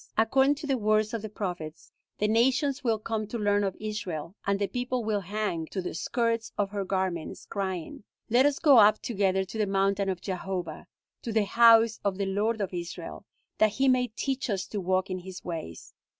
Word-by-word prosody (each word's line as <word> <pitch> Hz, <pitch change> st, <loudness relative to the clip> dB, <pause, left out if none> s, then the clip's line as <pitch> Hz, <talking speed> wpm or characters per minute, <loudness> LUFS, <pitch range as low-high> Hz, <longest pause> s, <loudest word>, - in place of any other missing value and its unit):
According 265 Hz, +6 st, +4 dB
to 295 Hz, +1 st, -8 dB
the 270 Hz, -3 st, 0 dB
words 215 Hz, 0 st, +2 dB
of 230 Hz, -, -2 dB
the 220 Hz, -, -6 dB
prophets, 175 Hz, -7 st, -6 dB, 0.3 s
the 210 Hz, -, +1 dB
nations 265 Hz, +5 st, +2 dB
will 230 Hz, -3 st, +2 dB
come 215 Hz, 0 st, -3 dB
to 235 Hz, -, -4 dB
learn 205 Hz, -1 st, +2 dB
of 195 Hz, -2 st, -2 dB
Israel, 190 Hz, -6 st, -5 dB
and 200 Hz, 0 st, +2 dB
the 200 Hz, -, 0 dB
people 250 Hz, +2 st, -2 dB
will 215 Hz, -2 st, +1 dB
hang 195 Hz, -4 st, -3 dB
to 190 Hz, -, -5 dB
the 180 Hz, -, -4 dB
skirts 230 Hz, +4 st, -1 dB
of 200 Hz, -1 st, 0 dB
her 200 Hz, -1 st, -2 dB
garments, 185 Hz, -4 st, -3 dB
crying, 190 Hz, -2 st, -4 dB, 0.2 s
'Let 245 Hz, +5 st, +4 dB
us 290 Hz, -, 0 dB
go 285 Hz, -7 st, +6 dB
up 215 Hz, 0 st, +6 dB
together 195 Hz, -4 st, +1 dB
to 220 Hz, +4 st, -7 dB
the 210 Hz, -, +1 dB
mountain 195 Hz, 0 st, +1 dB
of 185 Hz, -2 st, -2 dB
Jehovah, 180 Hz, -3 st, -5 dB, 0.3 s
to 230 Hz, -, -4 dB
the 215 Hz, -1 st, +2 dB
house 230 Hz, 0 st, +5 dB
of 200 Hz, -2 st, 0 dB
the 200 Hz, -, -1 dB
Lord 210 Hz, +3 st, 0 dB
of 190 Hz, -2 st, -3 dB
Israel, 175 Hz, -1 st, -6 dB, 0.3 s
that 215 Hz, -1 st, +4 dB
he 265 Hz, +5 st, +1 dB
may 255 Hz, -1 st, +3 dB
teach 265 Hz, +4 st, -3 dB
us 195 Hz, -2 st, -1 dB
to 205 Hz, -, -3 dB
walk 185 Hz, +1 st, 0 dB
in 185 Hz, -, -2 dB
his 185 Hz, 0 st, -10 dB
ways.' 160 Hz, -, -6 dB
205 Hz, 205 wpm, -28 LUFS, 190-230 Hz, 0.3 s, go